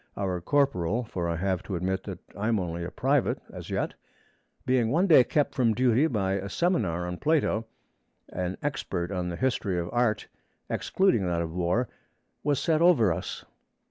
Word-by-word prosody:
Our 95 -3 -1
corporal 125 - +1
(for 90 -6 -3
I 85 - 0
have 95 +1 -1
to 95 - -5
admit 95 +2 -2
that - - -5 0.2
I 100 +3 -2
am 115 -3 +2
only 85 -1 -3
a 85 - -4
private 135 +6 +1
as - - -8
yet) - - -1 0.7
being 125 -3 +2
one 170 +9 +3
day 155 -9 +7
kept 145 +3 0
from 115 -4 +2
duty 125 +5 +3
by 100 -7 0
a 100 +1 -5
seminar 100 - 0
on 90 0 -4
Plato, 140 - +1 0.6
an 90 0 -3
expert 95 -11 -2
on 90 -2 -2
the 85 - -4
history 110 -5 0
of 85 0 -3
art, 120 -3 +1 0.4
excluding 185 - +2
that 85 -1 0
of 80 -1 -6
war, 90 +8 +1 0.6
was 145 -2 +1
set 160 -1 +1
over 135 - +5
us. - - -6
105 Hz, 175 wpm, -27 LUFS, 90-130 Hz, 0.7 s, day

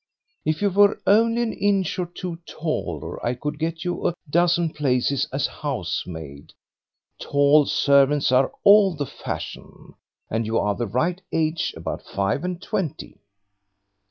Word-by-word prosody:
If 155 +5 0
you 200 - +2
were 205 +2 +4
only 230 +3 +4
an 225 - -2
inch 195 -3 0
or 180 - -1
two 175 0 -6
taller 100 - -4
I 120 +1 0
could 150 +4 -5
get 165 +2 -3
you 175 - -1
a 175 - -1
dozen 170 +1 +2
places 140 0 +1
as 135 - 0
housemaid; 80 - -5 0.7
tall 145 +1 +4
servants 140 -1 +3
are 130 +1 +3
all 200 -3 +6
the 145 -1 -3
fashion, - - -8 0.3
and 110 0 -2
you 115 +1 0
are 105 - +1
the 120 +3 -3
right 165 - -1
age 160 0 -1
about - - -5
five 100 - -2
and 180 -1 -3
twenty." 180 -4 -4
155 Hz, 145 wpm, -23 LUFS, 125-180 Hz, 0.7 s, all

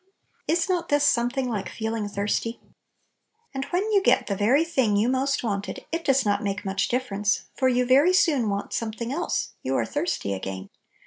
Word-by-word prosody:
Is 335 +2 +1
not 355 -3 -1
this 290 0 +3
something 250 0 +2
like 210 -5 -3
feel 220 0 -3
ing 215 -2 -2
thirsty? 210 +3 -2 0.9
And 270 0 -3
when 360 +2 0
you 400 -2 +4
get - - +3
the 200 - -2
very 240 +10 +3
thing 260 -11 +1
you 215 +3 +2
most 265 +2 0
wanted, 200 -3 -3
it 330 0 -2
does 270 -4 +2
not 205 0 +1
make 205 +1 -3
much 195 0 0
78 - - -6
Little 255 +1 0
Pillows. 205 - -5 0.2
difference, - - -30
for 260 - +2
you 250 0 +2
very 280 +8 +5
soon 300 - +3
want 200 0 -3
some 230 -1 -2
thing 235 +3 -4
else; 345 +4 -2
you - - -2
are - - +1
"thirsty" 290 - -2
again. 95 0 -6
245 Hz, 210 wpm, -25 LUFS, 205-285 Hz, 0.9 s, very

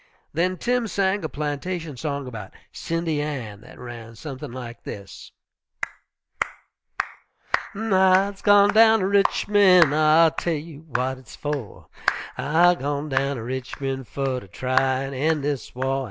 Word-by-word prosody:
Then 180 +4 +1
Tim 245 +4 0
sang 195 -1 0
a 160 - -2
plantation 150 +2 -4
song 140 +1 -3
about 115 -6 -8 0.2
"Cindy 165 -2 -2
Ann" 125 -9 -5
that 120 - -14
ran 115 -2 -9
something 140 +1 -7
like 120 -2 -8
this: 100 -1 -9 2.4
_I'se 195 -2 +3
gwine 205 0 +6
down 220 0 +6
ter 185 - +1
Richmond, 195 -4 +5
I'll 155 +1 +5
tell 170 - -1
you 155 0 -9
w'at 130 +1 -1
hit's 130 -2 -13
for: 145 -8 -5 0.5
I'se 175 +5 +4
gwine 145 +2 -2
down 135 +1 +1
ter 115 - -5
Richmond, 130 +1 -4
Fer 135 -2 -2
ter 100 - -14
try 130 +5 +1
an' 135 0 -5
end 150 +2 +1
dis 140 -4 -3
war. 135 +1 0
145 Hz, 140 wpm, -24 LUFS, 130-180 Hz, 2.4 s, gwine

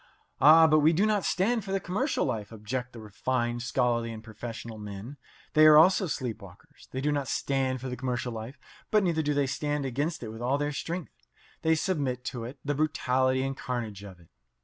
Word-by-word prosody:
"Ah, 160 +4 +8
but 155 -1 +5
we 155 +2 +4
do 190 +6 +3
not 210 -3 +1
stand 220 +5 +1
for 195 - -6
the 195 - +1
commercial 200 - -1
life," 105 -2 -3
object 120 +3 -4
the 120 - -11
refined, 120 +3 -2
scholarly, 120 -2 0
and 110 -1 -8
professional 110 0 -8
men. 105 +6 -8 0.4
They 155 0 +7
are 155 -1 +9
also 185 +4 +5
sleep 125 -7 -4
walkers. 100 - -16
They 130 - -4
do 150 +2 +1
not 145 -2 -1
stand 130 -1 -1
for 130 - -5
the 125 - -4
commercial 125 -1 -3
life, 115 +5 -7 0.3
but 215 -1 +3
neither 170 -3 +1
do 150 -1 0
they 140 -1 +2
stand 145 +1 -2
against 140 +4 -2
it 110 - -5
with 110 +1 -8
all 130 +3 +1
their 145 0 -1
strength. 165 - -6 0.3
They 160 0 +3
submit 140 -8 -1
to 120 -2 -5
it, 125 - -6
to - - -15
the - - +3
brutality 130 -3 +1
and 135 0 -2
carnage 115 -7 -4
of 95 -3 -11
it. 85 - -21
130 Hz, 215 wpm, -28 LUFS, 115-155 Hz, 0.4 s, are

